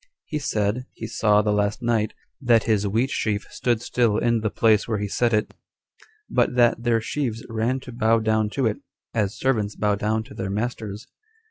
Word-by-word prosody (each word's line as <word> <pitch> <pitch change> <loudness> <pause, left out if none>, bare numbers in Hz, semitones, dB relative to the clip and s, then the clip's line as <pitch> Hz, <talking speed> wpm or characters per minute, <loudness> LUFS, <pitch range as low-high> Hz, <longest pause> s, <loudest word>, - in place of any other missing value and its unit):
He 150 - -3
said, 110 -1 -1
he - - -7
saw 105 -1 +2
the 105 - +1
last 105 +3 0
night, 110 -2 0 0.3
that 120 -4 +4
his 105 -2 +1
wheat 115 +7 0
sheaf 105 -2 -1
stood 120 -2 0
still 120 -3 +1
in 115 0 +2
the 110 0 -1
place 110 0 +3
where 110 -2 0
he 105 0 -2
set 120 +4 +1
it, 105 -1 0 0.7
but - - +1
that 120 -1 +4
their 115 -1 +2
sheaves 115 -2 -3
ran 115 +4 0
to 125 - -9
bow 115 -1 +2
down 110 -1 +1
to 135 - +2
it, 110 -2 +1 0.4
as 105 -3 0
servants 110 -6 0
bow 105 -1 +1
down 110 +2 0
to 135 +4 -13
their 95 - -4
masters. 105 0 -4
110 Hz, 195 wpm, -24 LUFS, 105-120 Hz, 0.7 s, that